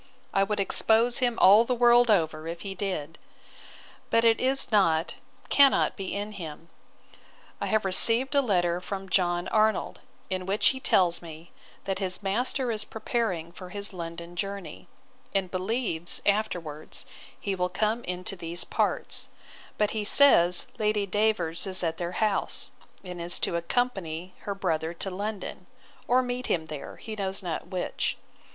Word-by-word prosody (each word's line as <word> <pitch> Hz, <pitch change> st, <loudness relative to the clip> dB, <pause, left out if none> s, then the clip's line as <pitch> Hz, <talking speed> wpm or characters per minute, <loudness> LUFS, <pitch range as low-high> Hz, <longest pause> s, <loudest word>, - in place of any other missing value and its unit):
I 195 Hz, -, +3 dB
would 205 Hz, +1 st, 0 dB
expose 225 Hz, +4 st, +4 dB
him 245 Hz, -2 st, 0 dB
all 205 Hz, +4 st, +7 dB
the 250 Hz, +1 st, -1 dB
world 240 Hz, 0 st, +5 dB
over 160 Hz, -5 st, +1 dB
if 170 Hz, +1 st, -6 dB
he 195 Hz, -1 st, -5 dB
did. 180 Hz, -5 st, -4 dB, 0.9 s
But 230 Hz, 0 st, +3 dB
it 225 Hz, -1 st, +4 dB
is 265 Hz, 0 st, 0 dB
not, 165 Hz, -6 st, +2 dB, 0.4 s
cannot 280 Hz, -1 st, +4 dB
be 195 Hz, -2 st, -5 dB
in 205 Hz, +1 st, -4 dB
him. 165 Hz, -4 st, -9 dB, 0.9 s
I -, -, -1 dB
have 215 Hz, -2 st, +1 dB
received 230 Hz, +8 st, +5 dB
a 280 Hz, -, +4 dB
letter 175 Hz, -7 st, +1 dB
from 195 Hz, 0 st, -6 dB
John 175 Hz, -2 st, +1 dB
Arnold, 215 Hz, -2 st, +1 dB, 0.3 s
in 185 Hz, -1 st, -4 dB
which 200 Hz, +2 st, +3 dB
he 265 Hz, -, -2 dB
tells 180 Hz, -8 st, +3 dB
me, 165 Hz, 0 st, -11 dB, 0.3 s
that 195 Hz, -1 st, -3 dB
his 185 Hz, 0 st, -1 dB
master 245 Hz, +5 st, 0 dB
is 215 Hz, -1 st, -1 dB
preparing 215 Hz, -7 st, -3 dB
for 180 Hz, +1 st, -11 dB
his 200 Hz, +1 st, -3 dB
London 170 Hz, 0 st, -7 dB
journey; 200 Hz, +1 st, -6 dB, 0.5 s
and 190 Hz, -2 st, 0 dB
believes, 185 Hz, -3 st, -1 dB
afterwards, 175 Hz, -8 st, -2 dB, 0.3 s
he 200 Hz, -, -2 dB
will 180 Hz, -1 st, -1 dB
come 215 Hz, +6 st, -1 dB
into 180 Hz, +2 st, -3 dB
these 170 Hz, -1 st, -2 dB
parts: -, -, -1 dB, 0.5 s
But 210 Hz, -1 st, +1 dB
he 215 Hz, -1 st, -2 dB
says, 180 Hz, -8 st, +6 dB
Lady 210 Hz, -1 st, +1 dB
Davers 200 Hz, -5 st, 0 dB
is 185 Hz, -1 st, +2 dB
at 165 Hz, -1 st, -1 dB
their 175 Hz, 0 st, -4 dB
house, 210 Hz, -2 st, -1 dB, 0.3 s
and 180 Hz, -2 st, -7 dB
is 175 Hz, +1 st, -2 dB
to -, -, -1 dB
accompany 180 Hz, -3 st, -2 dB
her 200 Hz, -, -5 dB
brother 165 Hz, -3 st, -2 dB
to 195 Hz, +3 st, -3 dB
London, 205 Hz, +2 st, -5 dB, 0.4 s
or 255 Hz, +1 st, +3 dB
meet 250 Hz, 0 st, -4 dB
him 160 Hz, -2 st, 0 dB
there, 155 Hz, -2 st, -8 dB
he 220 Hz, -2 st, -8 dB
knows 195 Hz, -2 st, -3 dB
not 170 Hz, -3 st, -4 dB
which. 185 Hz, -2 st, -2 dB
195 Hz, 160 wpm, -27 LUFS, 175-220 Hz, 0.9 s, all